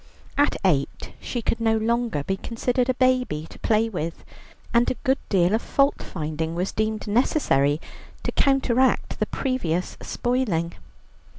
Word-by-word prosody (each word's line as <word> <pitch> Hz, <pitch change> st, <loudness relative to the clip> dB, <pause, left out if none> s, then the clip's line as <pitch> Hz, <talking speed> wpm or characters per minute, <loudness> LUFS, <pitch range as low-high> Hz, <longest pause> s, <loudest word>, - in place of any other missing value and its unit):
At 290 Hz, +1 st, +3 dB
eight 145 Hz, -7 st, 0 dB
she 240 Hz, -2 st, -4 dB
could 230 Hz, -, 0 dB
no 225 Hz, -1 st, +3 dB
longer 230 Hz, -7 st, 0 dB
be 190 Hz, -, -1 dB
considered 245 Hz, +4 st, -1 dB
a 255 Hz, -, +2 dB
baby 250 Hz, -, +1 dB
to -, -, -13 dB
play 220 Hz, +1 st, +2 dB
with, 170 Hz, -6 st, -5 dB, 0.5 s
and 235 Hz, 0 st, +4 dB
a -, -, -1 dB
good 270 Hz, 0 st, +2 dB
deal 185 Hz, -1 st, +3 dB
of 220 Hz, -, +2 dB
fault 280 Hz, 0 st, +2 dB
finding 160 Hz, -1 st, -4 dB
was 180 Hz, +3 st, -1 dB
deemed 215 Hz, 0 st, -1 dB
necessary 160 Hz, -, +2 dB, 0.4 s
to -, -, -1 dB
counteract 265 Hz, -2 st, +2 dB
the -, -, +1 dB
previous 185 Hz, -, -2 dB
spoiling. 220 Hz, -10 st, -1 dB
225 Hz, 150 wpm, -24 LUFS, 170-255 Hz, 0.5 s, and